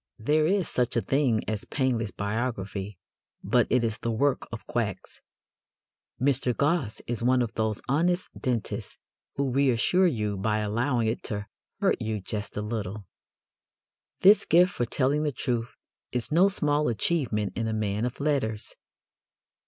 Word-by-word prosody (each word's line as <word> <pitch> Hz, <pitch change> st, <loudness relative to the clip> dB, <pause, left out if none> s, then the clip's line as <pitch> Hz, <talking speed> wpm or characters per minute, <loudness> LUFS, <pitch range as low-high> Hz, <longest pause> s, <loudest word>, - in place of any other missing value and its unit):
There 150 Hz, +7 st, +2 dB
is 195 Hz, 0 st, +1 dB
such 125 Hz, -1 st, 0 dB
a -, -, +3 dB
thing 135 Hz, -6 st, +2 dB
as 110 Hz, -1 st, -2 dB
painless 125 Hz, -6 st, 0 dB
biography, 100 Hz, -2 st, -3 dB, 0.5 s
but -, -, +3 dB
it 125 Hz, -2 st, +3 dB
is 110 Hz, -2 st, -1 dB
the 115 Hz, -, -2 dB
work 135 Hz, +5 st, +1 dB
of 115 Hz, -, -7 dB
quacks. 110 Hz, -5 st, -3 dB, 1.0 s
Mr. 130 Hz, -2 st, +1 dB
Gosse 145 Hz, -6 st, 0 dB
is 120 Hz, -1 st, -3 dB
one 125 Hz, +1 st, +3 dB
of 115 Hz, -, -4 dB
those 110 Hz, -1 st, -1 dB
honest 175 Hz, +6 st, +1 dB
dentists 120 Hz, -4 st, -3 dB, 0.4 s
who 140 Hz, -2 st, 0 dB
reassure 140 Hz, +8 st, +3 dB
you 105 Hz, -, -1 dB
by 105 Hz, +2 st, 0 dB
allowing 115 Hz, +3 st, 0 dB
it 110 Hz, -, -1 dB
to 105 Hz, -1 st, -3 dB, 0.4 s
hurt -, -, +2 dB
you 110 Hz, -1 st, -2 dB
"just 105 Hz, +2 st, -5 dB
a 105 Hz, -, -1 dB
little." 105 Hz, -2 st, -4 dB, 1.2 s
This 200 Hz, +3 st, +7 dB
gift 180 Hz, +3 st, +4 dB
for 120 Hz, -, -1 dB
telling 135 Hz, +5 st, +1 dB
the 150 Hz, -1 st, 0 dB
truth 120 Hz, -2 st, -2 dB, 0.4 s
is 125 Hz, 0 st, -2 dB
no 175 Hz, +5 st, +6 dB
small 150 Hz, -5 st, +1 dB
achievement 115 Hz, -3 st, 0 dB
in 115 Hz, -1 st, -1 dB
a -, -, -1 dB
man 105 Hz, 0 st, -1 dB
of 125 Hz, +1 st, -3 dB
letters. 135 Hz, -8 st, -1 dB
120 Hz, 150 wpm, -27 LUFS, 110-140 Hz, 1.2 s, This